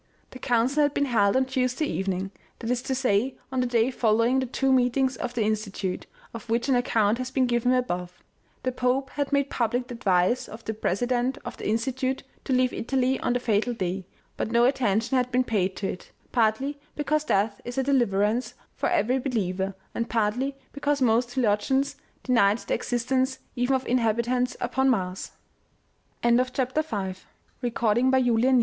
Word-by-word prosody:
The 255 - -10
council 250 +5 +2
had 290 -1 +2
been 285 - +2
held 205 -6 +2
on 260 - +3
Tuesday 255 +2 0
evening, 190 -5 -2 0.3
that 230 0 -3
is 245 -1 0
to 265 - -2
say 250 -1 +1 0.2
on 260 - -1
the 250 - +1
day 240 +1 +2
following 230 +2 +2
the 260 - -1
two 270 +2 0
meetings 260 +1 +2
of 245 0 -4
the 230 - +1
Insti 215 -1 -1
tute, 190 -1 -4 0.3
of 230 0 -9
which 235 +3 +1
an 270 - +3
account 230 -2 +2
has 255 0 -3
been 260 -1 +2
given 245 0 +1
above. 180 -8 -1 0.5
The 255 - 0
Pope 255 +2 0
had 285 -1 -2
made 280 -1 +1
public 245 +1 0
the - - -5
advice 200 0 +1
of 225 +1 -11
the 220 - -2
president 245 +5 0
of 240 - -6
the - - -5
Institute 260 +4 -1 0.2
to - - -3
leave 255 0 +2
Italy 260 +1 0
on 245 - 0
the 245 - +1
fatal 235 0 0
day, 185 -2 -3 0.3
but - - -2
no 235 +1 +4
attention 240 -1 +1
had 250 0 0
been 250 +1 +3
paid 195 -6 0
to 195 - -3
it, - - -11 0.2
partly 250 +5 +1 0.2
because 300 +1 0
death 200 -2 +1
is 245 +1 -7
a 265 - +2
deliverance 235 -3 +1 0.2
for - - 0
every 265 -7 +2
believer, 195 -7 -2 0.2
and 230 - -2
partly 235 +5 0 0.2
because 285 0 0
most 240 -1 +3
theologians 260 +4 +1 0.3
denied 215 -5 +3
the - - -4
existence 260 +2 0 0.2
even 250 +2 +1
of 260 - -2
inhabitants 245 +1 +1
upon 265 +2 +1
Mars. 185 -6 -1
245 Hz, 170 wpm, -26 LUFS, 220-260 Hz, 0.5 s, no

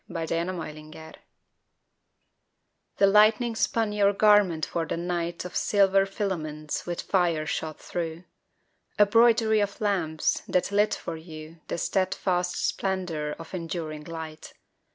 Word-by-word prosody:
THE - - -12
LIGHTS 165 -1 -3
OF 170 +3 -1
NEW 155 -1 -8
YORK 160 0 -12 1.8
THE 200 - +5
lightning 215 +4 +4
spun 225 -1 0
your 200 -1 +3
garment 200 -6 +4
for 165 -1 -3
the - - -2
night 170 0 -3
Of 180 - -8
silver 195 -1 +3
filaments 155 -8 -4
with 175 -1 -3
fire 170 -5 +1
shot 155 0 -4
thru, 165 0 -5 0.7
A 210 - +7
broidery 225 0 +4
of 200 -1 -2
lamps 175 -7 0
that 180 +2 0
lit 205 +1 +2
for 165 - -6
you 160 0 -11
The - - -3
steadfast 180 -1 0
splendor 180 -6 -2
of 165 - -11
enduring 165 -3 -5
light. 160 -1 -8
175 Hz, 135 wpm, -26 LUFS, 160-200 Hz, 1.8 s, A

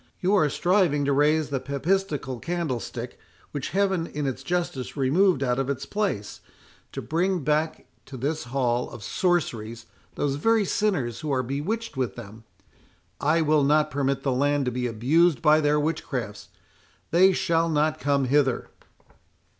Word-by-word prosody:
You 185 +3 +1
are 155 -7 +4
striving 175 -3 +2
to 140 - +2
raise 150 +1 +2
the 135 - 0
papistical 140 -1 -2
candlestick 125 -8 -4 0.3
which 145 -2 -4
Heaven 190 -2 0
in 150 0 -4
its 135 -1 -3
justice 160 -4 -3
removed 145 +3 +3
out 125 0 0
of 135 0 -1
its 140 0 -3
place—to 200 - -5
bring 180 +1 0
back 155 +2 0 0.2
to 135 - -8
this 145 +4 -2
hall 125 -1 -1
of 105 - -10
sorceries 115 - -1 0.3
those 140 -1 -1
very 225 +6 +2
sinners 175 - -1
who 155 -2 -4
are 130 -2 +1
bewitched 150 - -3
with 130 -3 -1
them. 110 -1 -11 0.7
I 160 +3 +2
will 155 -1 +3
not 150 +2 +3
permit 135 -1 -1
the 135 - +1
land 145 +2 +1
to 125 - 0
be 125 +1 -2
abused 140 +9 +2
by 155 -1 +4
their 150 0 +2
witchcrafts.—They 150 - -2
shall 165 -1 +1
not 155 0 +1
come 140 -1 +1
hither." 135 -1 +1
145 Hz, 150 wpm, -25 LUFS, 130-165 Hz, 0.7 s, are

